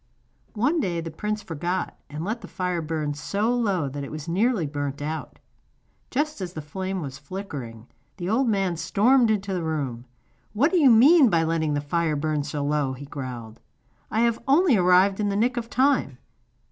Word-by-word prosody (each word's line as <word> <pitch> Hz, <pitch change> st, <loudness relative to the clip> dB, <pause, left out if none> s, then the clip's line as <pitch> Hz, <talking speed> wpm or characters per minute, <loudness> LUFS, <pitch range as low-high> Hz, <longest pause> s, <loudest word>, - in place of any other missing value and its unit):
One 275 Hz, +10 st, +2 dB
day 175 Hz, -, -1 dB
the 165 Hz, 0 st, -5 dB
prince 210 Hz, +5 st, -3 dB
forgot, 175 Hz, +3 st, -3 dB
and 150 Hz, +2 st, -5 dB
let 225 Hz, +3 st, -3 dB
the -, -, -9 dB
fire 180 Hz, -2 st, -2 dB
burn 155 Hz, -2 st, -2 dB
so 200 Hz, +11 st, -1 dB
low 200 Hz, -, 0 dB
that 140 Hz, +1 st, -5 dB
it 140 Hz, -, -6 dB
very 155 Hz, +2 st, -5 dB
nearly 215 Hz, -2 st, +2 dB
burnt 145 Hz, -1 st, -4 dB
out. 155 Hz, +2 st, -5 dB, 0.7 s
Just 300 Hz, -2 st, -1 dB
as 180 Hz, -1 st, -5 dB
the 155 Hz, -, -5 dB
flame 185 Hz, +4 st, -4 dB
was 135 Hz, -2 st, -7 dB
flickering 135 Hz, -, -7 dB, 0.3 s
the 175 Hz, -2 st, -4 dB
old 240 Hz, +6 st, +2 dB
man 195 Hz, -5 st, 0 dB
stormed 235 Hz, +7 st, +3 dB
into 200 Hz, -2 st, 0 dB
the 180 Hz, -, -1 dB
room. 140 Hz, -7 st, -3 dB, 0.5 s
'What 270 Hz, +10 st, +2 dB
do 365 Hz, -, +3 dB
you 285 Hz, -4 st, +6 dB
mean 265 Hz, +5 st, +7 dB
by 165 Hz, -4 st, +2 dB
letting 160 Hz, -2 st, 0 dB
the 145 Hz, -, -1 dB
fire 160 Hz, +1 st, 0 dB
burn 150 Hz, 0 st, -1 dB
so 145 Hz, 0 st, -4 dB
low?' 145 Hz, -2 st, 0 dB
he 135 Hz, +2 st, -9 dB
growled. 125 Hz, -5 st, -7 dB, 0.5 s
'I 220 Hz, -, 0 dB
have 235 Hz, -1 st, +2 dB
only 295 Hz, 0 st, +5 dB
arrived 185 Hz, +1 st, +4 dB
in 205 Hz, -1 st, +1 dB
the 200 Hz, -, -1 dB
nick 240 Hz, +4 st, +1 dB
of 235 Hz, -1 st, -4 dB
time. 260 Hz, -, +1 dB
180 Hz, 190 wpm, -25 LUFS, 150-220 Hz, 0.7 s, mean